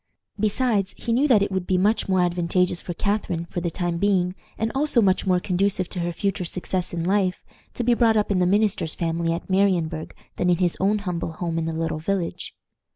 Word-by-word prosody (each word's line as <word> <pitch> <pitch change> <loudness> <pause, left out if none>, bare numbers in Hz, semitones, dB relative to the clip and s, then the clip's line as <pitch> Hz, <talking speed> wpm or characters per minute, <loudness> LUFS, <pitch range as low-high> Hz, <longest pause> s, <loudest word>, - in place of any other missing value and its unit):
Besides, 215 -2 +1
he 230 - -2
knew 270 +5 +3
that 220 -7 +5
it 200 - -2
would 190 -1 -2
be 185 - +2
much 205 +3 +1
more 185 -1 +3
advantageous 175 0 +1
for 175 - -6
Catharine, 195 -4 -1
for 175 - -5
the 170 - -1
time 175 +1 -2
being, 185 -2 +2 0.2
and 225 +1 -1
also 275 -2 +2
much 195 -2 +2
more 180 -1 +3
conducive 185 0 0
to 180 - -5
her 175 0 -1
future 195 +1 -2
success 180 +1 -3
in 170 -1 -3
life, 185 0 0 0.3
to 245 - -2
be 240 +1 +3
brought 230 -2 +3
up 210 -1 +1
in 190 - +2
the 180 - +3
minister's 200 -5 +2
family 165 0 -1
at 165 - -4
Marienburg 180 -5 0 0.2
than 180 - +1
in 175 - +3
his 175 -1 +1
own 200 +3 +2
humble 170 -2 -3
home 165 0 -2
in 160 - -2
the 165 - -2
little 165 -1 -2
village. 180 +1 -3
185 Hz, 220 wpm, -24 LUFS, 170-200 Hz, 0.3 s, that